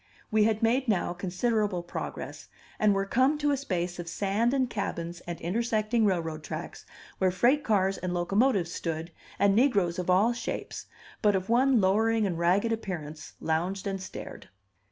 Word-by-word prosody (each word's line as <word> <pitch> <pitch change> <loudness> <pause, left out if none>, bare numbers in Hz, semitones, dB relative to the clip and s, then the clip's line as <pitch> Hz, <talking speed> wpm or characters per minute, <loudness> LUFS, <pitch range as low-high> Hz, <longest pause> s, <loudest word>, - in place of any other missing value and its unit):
We 215 -1 +4
had 220 0 +1
made 250 +4 +2
now 190 -5 +1
considerable 190 +1 -1
progress, 175 - -6 0.3
and 210 -2 +4
were 195 0 0
come 260 +8 +2
to 295 -1 +1
a - - +3
space 180 -10 -3
of 175 - -5
sand 205 +6 0
and 265 -1 +1
cabins 175 -6 -4
and 175 -1 -5
intersecting 220 +3 0
railroad 165 -5 -1
tracks, 160 +2 -7 0.3
where 190 - +3
freight 240 +11 +2
cars 195 -3 +1
and 185 - -3
locomotives 195 +2 +1
stood, 165 0 -4 0.3
and 200 -1 +3
negroes 205 -9 +2
of 180 - -3
all 200 +6 +4
shapes, 235 - -5 0.3
but 210 -2 +4
of 190 +1 -2
one 255 +1 +4
lowering 220 +3 +2
and 175 -4 -2
ragged 185 +6 +2
appearance, 165 -9 -5
lounged 180 +5 -1
and 195 -1 -3
stared. 190 - -9
195 Hz, 165 wpm, -28 LUFS, 175-225 Hz, 0.3 s, We